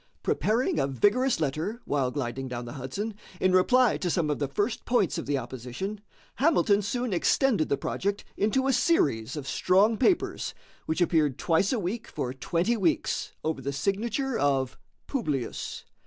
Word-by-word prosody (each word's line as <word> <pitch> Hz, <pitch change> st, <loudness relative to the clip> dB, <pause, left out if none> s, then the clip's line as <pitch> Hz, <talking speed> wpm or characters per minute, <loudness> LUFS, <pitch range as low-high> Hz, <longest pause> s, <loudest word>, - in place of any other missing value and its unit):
Preparing 225 Hz, -, +1 dB
a 135 Hz, -, +2 dB
vigorous 205 Hz, -, +2 dB
letter, 160 Hz, -, -2 dB
while 140 Hz, -3 st, 0 dB
gliding 130 Hz, -1 st, -3 dB
down 120 Hz, -1 st, -5 dB
the 120 Hz, -, -7 dB
Hudson, 150 Hz, -, -4 dB, 0.3 s
in 185 Hz, -, +3 dB
reply 240 Hz, +6 st, +4 dB
to 180 Hz, -, -2 dB
some 160 Hz, -3 st, +1 dB
of 145 Hz, -, -2 dB
the 140 Hz, -, 0 dB
first 205 Hz, -, -1 dB
points 235 Hz, -8 st, +1 dB
of -, -, -6 dB
the 145 Hz, -1 st, +1 dB
opposition, 130 Hz, -, -5 dB, 0.4 s
Hamilton 235 Hz, -8 st, +3 dB
soon 240 Hz, +2 st, -2 dB
extended 210 Hz, -, +2 dB
the 140 Hz, -, +2 dB
project 200 Hz, +1 st, -2 dB
into 240 Hz, +6 st, +1 dB
a 270 Hz, -, +3 dB
series 145 Hz, -, +2 dB
of 145 Hz, -3 st, -6 dB
strong 195 Hz, +10 st, +3 dB
papers, 345 Hz, -, +1 dB, 0.3 s
which 160 Hz, +3 st, -1 dB
appeared 155 Hz, -6 st, +2 dB
twice 170 Hz, +3 st, +2 dB
a 255 Hz, -, +1 dB
week 215 Hz, +5 st, -3 dB
for 125 Hz, -, -4 dB
twenty 170 Hz, -, 0 dB
weeks 180 Hz, -7 st, 0 dB
over 160 Hz, -3 st, -2 dB
the 140 Hz, +2 st, -2 dB
signature 225 Hz, -, -1 dB
of 135 Hz, -2 st, +1 dB, 0.3 s
"Publius." 150 Hz, -, -3 dB
180 Hz, 165 wpm, -27 LUFS, 140-225 Hz, 0.4 s, reply